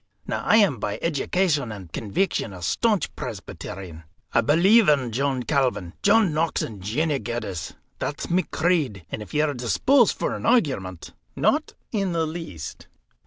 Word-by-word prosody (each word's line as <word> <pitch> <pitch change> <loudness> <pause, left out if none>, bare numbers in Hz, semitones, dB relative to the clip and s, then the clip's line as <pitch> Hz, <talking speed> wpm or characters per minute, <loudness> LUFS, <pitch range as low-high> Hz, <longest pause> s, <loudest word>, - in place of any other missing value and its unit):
Now, - - -3
I - - +4
am 190 - +4
by 105 0 -2
education 155 -4 0
and 95 -6 -9
conveection 110 - -1
a 90 - -10
staunch 215 - +1
Presbyterian. 90 -4 -7 0.3
I - - +5
believe 180 - +5
in 135 -5 +2
John 135 +1 0
Calvin, 125 - 0
John 205 -4 +4
Knox, 160 +2 0
and 105 -4 -7
Jeannie 140 - 0
Geddes. 100 -7 -4 0.2
That's - - -3
my 180 +2 +2
creed; 155 - 0
and - - -4
if 105 - -9
ye 150 - +4
are 150 -1 +1
disposed 230 - +3
for - - -1
an - - -6
argument 130 - 0
" - - -42
"Not 305 +1 +1 0.2
in 195 -5 0
the 165 -1 +1
least." 155 - -7
140 Hz, 165 wpm, -24 LUFS, 105-175 Hz, 0.3 s, I